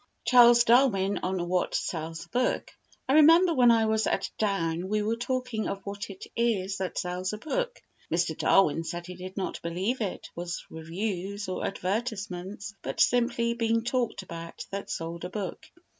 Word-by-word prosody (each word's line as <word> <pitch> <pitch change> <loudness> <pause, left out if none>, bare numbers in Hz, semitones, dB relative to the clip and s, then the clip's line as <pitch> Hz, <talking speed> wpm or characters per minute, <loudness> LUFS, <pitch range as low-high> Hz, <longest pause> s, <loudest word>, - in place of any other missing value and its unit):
Charles 240 -1 +7
Darwin 220 -6 +3
on 185 -1 -2
what 180 0 0
Sells 165 -1 -3
a - - -29
Book 250 +1 0 0.4
I 265 - +2
remember 330 +4 +7
when 250 -4 +5
I 225 -1 +5
was 220 0 +1
at 190 -1 -1
Down 180 -4 0
we 210 0 +1
were 220 +2 0
talking 245 -2 -2
of 195 -1 -5
what 200 +1 -5
it 190 -1 -9
is 200 -5 0
that 190 -1 -3
sells 180 +1 -2
a - - -3
book. - - -3 0.3
Mr. - - +1
Darwin 165 -4 +3
said 170 +1 -5
he 180 - -7
did 185 +2 -9
not 190 - -3
believe 185 +9 -2
it 200 -4 -3
was 175 0 -5
reviews 190 +4 -4
or 185 - -3
advertisements, 200 -1 -4
but - - -5
simply 235 -1 +3
"being 230 -1 +1
talked 240 -4 -1
about" 170 -2 -8
that 200 0 -5
sold 165 +1 -4
a 180 - -4
book. 195 -2 -5
200 Hz, 175 wpm, -28 LUFS, 180-235 Hz, 0.4 s, Charles